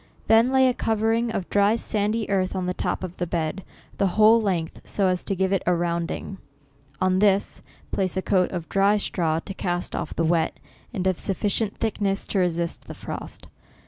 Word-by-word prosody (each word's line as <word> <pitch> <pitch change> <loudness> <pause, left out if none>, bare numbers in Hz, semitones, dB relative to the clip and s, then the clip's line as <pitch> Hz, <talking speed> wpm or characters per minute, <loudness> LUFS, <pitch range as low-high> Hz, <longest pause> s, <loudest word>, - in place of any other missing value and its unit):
Then 225 +2 +5
laj 265 0 +4
a 250 - +2
covering 225 +1 0
of 195 -5 -3
dry 205 +2 +4
sandy 215 -1 -1
earth 190 -1 0
on 185 -1 -2
the 180 - -1
top - - -2
of 180 -1 -6
the 175 - -2
bed, 165 +3 -2 0.4
the 200 - +3
whole 220 +2 +7
length, 175 -6 -2
so 200 - -1
as 185 -1 +1
to 195 - 0
give 190 +1 +1
it 195 - +1
a 180 - +4
rounding. 170 +2 -3 0.6
On 185 0 +2
this, 200 -1 +2 0.3
place 190 -2 -1
a 190 - -1
coat 185 -2 +2
of 170 -3 -4
dry 200 +2 +3
straw, 165 -5 0
to 195 - -6
cast 175 -2 -3
off - - -4
the 165 - +1
wet, 165 -1 +1 0.3
and 190 -6 -3
of 185 -2 +2
a - - -9
sufficient 205 +2 -1
thickness 200 -3 -1
to 200 - -1
resist 170 -2 -1
the - - -8
frost. - - -8
190 Hz, 200 wpm, -24 LUFS, 180-210 Hz, 0.6 s, whole